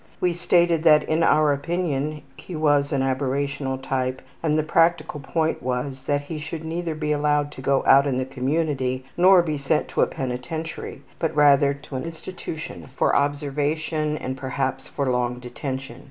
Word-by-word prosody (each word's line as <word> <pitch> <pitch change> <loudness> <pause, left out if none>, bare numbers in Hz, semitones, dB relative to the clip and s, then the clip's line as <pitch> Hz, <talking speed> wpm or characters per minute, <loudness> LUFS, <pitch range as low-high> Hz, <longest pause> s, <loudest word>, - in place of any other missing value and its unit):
We 180 -1 +1
stated 170 -1 +2
that 155 -2 +6
in 155 +2 0
our 155 -3 +4
opinion 150 -1 -2
he 180 - -9
was 145 -2 +2
an 135 -2 +1
aberrational 135 0 -1
type 130 -1 -2 0.2
and 155 -2 +1
the 155 - +2
practical 165 -1 +2
point 160 +3 -1
was 130 +2 -3
that 145 -1 +1
he 150 +2 -6
should 150 +2 -6
neither 165 0 -3
be 150 -1 -2
allowed 145 0 +1
to 130 - -10
go 135 0 +2
out 140 +1 +6
in 130 -2 0
the 130 - -1
community, 130 -1 -1
nor 180 0 +6
be 155 -3 -2
sent 150 +2 0
to - - 0
a - - +4
penitentiary, 130 +6 -5 0.2
but 160 -1 -1
rather 140 -1 +5
to 140 -1 -10
an 130 - -4
institution 165 -1 -7
for 130 - +1
observation 150 +2 0
and 130 -2 -4
perhaps 135 0 -2
for 140 - -2
long 125 -1 0
detention. 130 0 -6
145 Hz, 170 wpm, -24 LUFS, 135-160 Hz, 0.2 s, that